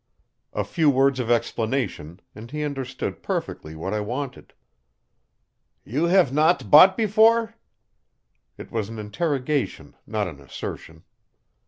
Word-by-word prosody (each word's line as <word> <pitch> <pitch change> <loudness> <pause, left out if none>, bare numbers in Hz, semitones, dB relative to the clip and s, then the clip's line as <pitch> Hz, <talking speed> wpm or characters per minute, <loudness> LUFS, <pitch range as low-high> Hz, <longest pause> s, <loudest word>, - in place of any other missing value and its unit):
A - - -1
few 160 -4 +1
words 135 -1 +3
of 120 -2 -2
explanation, 115 - -1
and 110 +3 -11
he 150 +2 -4
understood 130 - -4
perfectly 80 +1 -4
what 90 +6 -4
I 105 - 0
wanted. 125 +5 -5 1.3
"You 145 +9 0
have 175 -6 +3
not 150 - +2
bought 185 +5 +8
before?" 225 +1 +3 1.0
It - - -11
was 110 -2 -2
an 115 - -8
interrogation, 140 +5 -2
not 105 -2 -1
an 70 -5 -10
assertion. 80 +3 -8
130 Hz, 125 wpm, -24 LUFS, 105-155 Hz, 1.3 s, bought